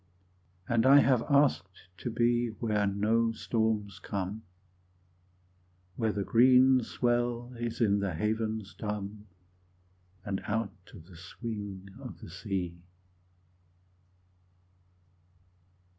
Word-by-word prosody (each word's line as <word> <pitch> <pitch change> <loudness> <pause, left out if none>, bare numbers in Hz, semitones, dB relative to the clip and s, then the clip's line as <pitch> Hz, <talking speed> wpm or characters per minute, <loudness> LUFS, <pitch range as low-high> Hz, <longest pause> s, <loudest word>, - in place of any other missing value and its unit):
And 115 -1 +2
I 140 +1 +8
have 130 -4 +3
asked 95 - +1
to - - -3
be 120 +1 +2
Where 105 -3 +1
no 110 +3 +1
storms 110 -3 -1
come, 100 +2 -4 1.5
Where 110 -2 0
the 100 -1 -2
green 130 +3 +5
swell 120 +1 -1
is 120 0 -4
in 100 -3 +3
the 100 -4 -2
havens 110 +2 -2
dumb, 105 0 -5 1.0
And 100 -2 -2
out 110 0 -1 0.2
of 80 - -13
the 90 -1 -15
swing 100 +1 -7
of 130 -3 -9
the - - -11
sea. 90 -3 -4
110 Hz, 100 wpm, -30 LUFS, 100-120 Hz, 1.5 s, I